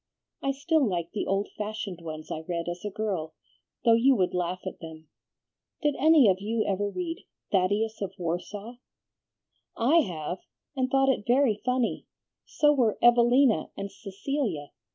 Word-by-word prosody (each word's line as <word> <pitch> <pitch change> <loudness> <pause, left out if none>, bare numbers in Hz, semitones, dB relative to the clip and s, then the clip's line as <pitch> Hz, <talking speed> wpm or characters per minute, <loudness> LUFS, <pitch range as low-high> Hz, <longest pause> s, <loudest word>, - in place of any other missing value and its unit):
I 275 - -1
still 300 +3 +1
like 175 -7 -1
the 215 - -3
old 195 +1 0
fashioned 210 -4 -4
ones 155 -1 -7
I - - -3
read 170 -1 -3
as 175 0 -5
a 210 - -2
girl, 195 -7 -3 0.5
though 230 - +7
you 255 +4 +5
would 185 -5 +1
laugh 180 0 -2
at 190 - -6
them. 160 -1 -11 0.7
Did 295 -1 +3
any 310 -4 +6
of 190 -2 +4
you 220 +2 -1
ever 205 +1 0
read 335 - -4 0.3
'Thaddeus 205 +4 +1
of 195 -2 -2
Warsaw'?" 200 +7 -4 1.0
"I 260 +9 +4
have, 175 - -1 0.4
and 260 -1 0
thought 270 +1 +3
it 215 -6 0
very 245 -4 +3
funny; 250 -2 -1 0.4
so 295 0 +3
were 240 -7 +2
'Evelina' 240 +1 +4
and 200 0 -5
'Cecilia.' 200 - -4
210 Hz, 155 wpm, -27 LUFS, 180-255 Hz, 1.0 s, though